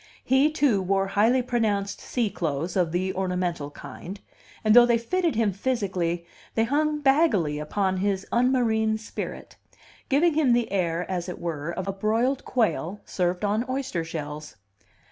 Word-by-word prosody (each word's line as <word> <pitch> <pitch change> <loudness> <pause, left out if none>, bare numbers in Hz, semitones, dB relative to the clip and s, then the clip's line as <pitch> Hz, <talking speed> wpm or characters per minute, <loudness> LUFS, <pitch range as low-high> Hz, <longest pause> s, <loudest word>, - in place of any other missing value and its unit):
He, 265 +3 +4
too, 280 -10 +2
wore 195 +1 0
highly 230 +6 +3
pronounced 215 -5 -1
sea 235 -5 -1
clothes 165 +1 -2
of 175 -4 +1
the 185 +2 -1
ornamental 180 -5 -2
kind; 155 +7 -9 0.4
and 215 0 +4
though 240 0 +9
they 235 -1 +4
fitted 335 +6 0
him 215 -3 +1
physically, 185 -7 -1 0.3
they 225 - +3
hung 300 +4 0
baggily 230 - +3
upon 190 +5 -1
his 195 0 -1
unmarine 235 -3 +2
spirit; 220 - -7 0.5
giving 310 +5 +3
him 295 -5 +3
the 240 -3 +1
air, 175 -3 0
as 180 -1 -3
it 180 - -5
were, 165 -2 -4
of 185 +2 -4
a 195 - -1
broiled 225 +7 0
quail 210 -5 0
served 180 +2 -1
on 210 +3 +1
oyster 260 -10 -2
shells. 150 -2 -6
200 Hz, 155 wpm, -25 LUFS, 180-245 Hz, 0.5 s, though